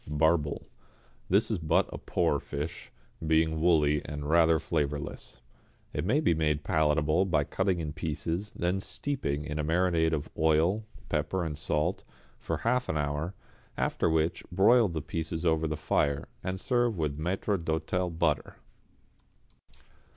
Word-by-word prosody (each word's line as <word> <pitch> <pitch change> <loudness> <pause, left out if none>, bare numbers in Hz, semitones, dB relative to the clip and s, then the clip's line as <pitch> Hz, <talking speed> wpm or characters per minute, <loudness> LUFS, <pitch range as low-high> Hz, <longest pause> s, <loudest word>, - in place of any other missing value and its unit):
=Barbel.= 75 0 +1 0.7
This 100 +5 +3
is 105 - 0
but 80 -2 +2
a - - -6
poor - - +1
fish, 75 +4 -6 0.3
being 80 0 +2
woolly 75 -4 +3
and 75 0 -5
rather 80 0 +5
flavourless. 75 -5 -3 0.5
It 75 - -2
may 125 +10 +3
be 145 - +3
made 75 -2 0
palatable 80 0 +2
by 85 -6 +2
cutting 95 +4 0
in 75 -2 -4
pieces, 80 +6 -3
then 90 +2 0
steeping 85 - -3
in 75 0 -4
a - - 0
marinade 80 0 +2
of 75 -2 -2
oil, 80 +7 +2 0.2
pepper 95 -2 -1
and 75 -2 -3
salt, 75 +4 -1 0.4
for - - -2
half 125 +2 +1
an 80 - 0
hour, 75 +5 -2 0.4
after - - +1
which 80 +1 +1
broil 110 +6 +5
the 80 -5 -4
pieces 80 +2 -3
over 80 -1 +2
the 75 0 -3
fire, 70 -2 0 0.2
and 95 +1 -3
serve 120 -1 +1
with 75 -2 -2
maître 95 +2 -1
d'hôtel 80 +2 -1
butter. 75 -4 0
80 Hz, 145 wpm, -29 LUFS, 75-90 Hz, 0.7 s, rather